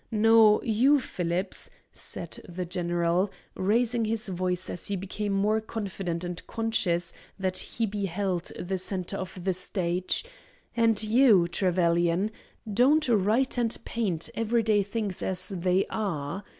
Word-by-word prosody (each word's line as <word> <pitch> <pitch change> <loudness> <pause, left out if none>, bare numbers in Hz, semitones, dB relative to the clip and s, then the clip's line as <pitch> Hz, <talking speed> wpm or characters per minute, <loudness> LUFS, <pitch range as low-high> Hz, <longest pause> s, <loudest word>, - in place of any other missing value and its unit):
No; 225 -1 +5
you, 255 +6 +4
Phillips," 180 -4 -3 0.2
said - - -4
the 180 +1 -4
general, 175 +1 0 0.2
raising 230 +4 +1
his 220 -1 0
voice 180 0 -1
as 175 - -3
he 200 - -1
became 200 +2 -3
more 210 +3 +1
confident 195 -6 -4
and 175 -1 -6
conscious 185 -7 0 0.2
that 185 -1 0 0.2
be 205 0 -3
held 185 -1 -2
the 190 +1 -3
centre 185 +1 -2
of 185 -1 -7
the 190 0 +1
stage, 180 - -1 0.5
"and 225 -2 +3
you, 215 -5 +5
Trevelyan, 175 +1 +1 0.4
don't 275 +8 +4
write 230 +5 +2
and 230 -2 +1
paint 190 -9 -1
every 230 +1 0
day 210 -2 +3
things 205 -1 -2
as 185 -1 +1
they 185 0 +1
are. 190 -3 -3
195 Hz, 135 wpm, -27 LUFS, 180-220 Hz, 0.5 s, No